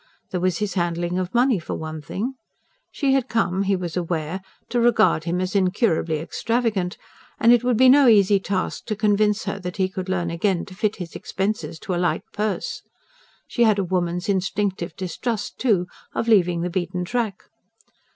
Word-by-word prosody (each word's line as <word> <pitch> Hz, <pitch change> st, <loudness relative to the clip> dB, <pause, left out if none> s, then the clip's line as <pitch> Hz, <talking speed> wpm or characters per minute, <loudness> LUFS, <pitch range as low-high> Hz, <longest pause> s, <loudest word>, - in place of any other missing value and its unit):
There 180 Hz, -, -1 dB
was 185 Hz, -2 st, +1 dB
his 210 Hz, -3 st, -2 dB
handling 175 Hz, 0 st, -1 dB
of 185 Hz, 0 st, -3 dB
money 245 Hz, -3 st, +3 dB
for 165 Hz, -, -5 dB
one 155 Hz, -1 st, -6 dB
thing: 210 Hz, -, -4 dB, 0.6 s
she 275 Hz, -2 st, +1 dB
had 265 Hz, -2 st, +1 dB
come, 195 Hz, -4 st, +1 dB
he 200 Hz, 0 st, +2 dB
was 175 Hz, -3 st, -4 dB
aware, 170 Hz, 0 st, -2 dB, 0.3 s
to 240 Hz, -, 0 dB
regard 225 Hz, -8 st, +3 dB
him 175 Hz, +1 st, -1 dB
as 185 Hz, +1 st, -2 dB
incurably 185 Hz, -4 st, +1 dB
extravagant; 210 Hz, +2 st, -1 dB, 0.4 s
and 235 Hz, +1 st, +6 dB
it 240 Hz, -1 st, +3 dB
would 245 Hz, -2 st, +2 dB
be 260 Hz, +2 st, +6 dB
no 275 Hz, +1 st, +7 dB
easy 205 Hz, -3 st, +5 dB
task 190 Hz, -1 st, -3 dB
to 215 Hz, -, -2 dB
convince 210 Hz, 0 st, +2 dB
her 200 Hz, 0 st, -3 dB
that 180 Hz, 0 st, -6 dB
he 190 Hz, -1 st, +2 dB
could 185 Hz, 0 st, -6 dB
learn 175 Hz, -3 st, -1 dB
again 175 Hz, +1 st, 0 dB
to 195 Hz, -, -12 dB
fit 210 Hz, +2 st, 0 dB
his 175 Hz, -4 st, -8 dB
expenses 200 Hz, -2 st, -3 dB
to 185 Hz, -, -3 dB
a 175 Hz, -, 0 dB
light 180 Hz, -, 0 dB
purse. 215 Hz, -, -2 dB, 0.6 s
She 240 Hz, -, -3 dB
had 215 Hz, -3 st, +4 dB
a 200 Hz, -, +1 dB
woman's 175 Hz, -1 st, -1 dB
instinctive 190 Hz, -3 st, -1 dB
distrust, 200 Hz, +4 st, -4 dB
too, 205 Hz, -8 st, +2 dB, 0.3 s
of 230 Hz, -, -1 dB
leaving 180 Hz, -6 st, +4 dB
the 175 Hz, +1 st, -2 dB
beaten 180 Hz, 0 st, -2 dB
track. 220 Hz, -1 st, -2 dB
190 Hz, 185 wpm, -23 LUFS, 180-215 Hz, 0.6 s, no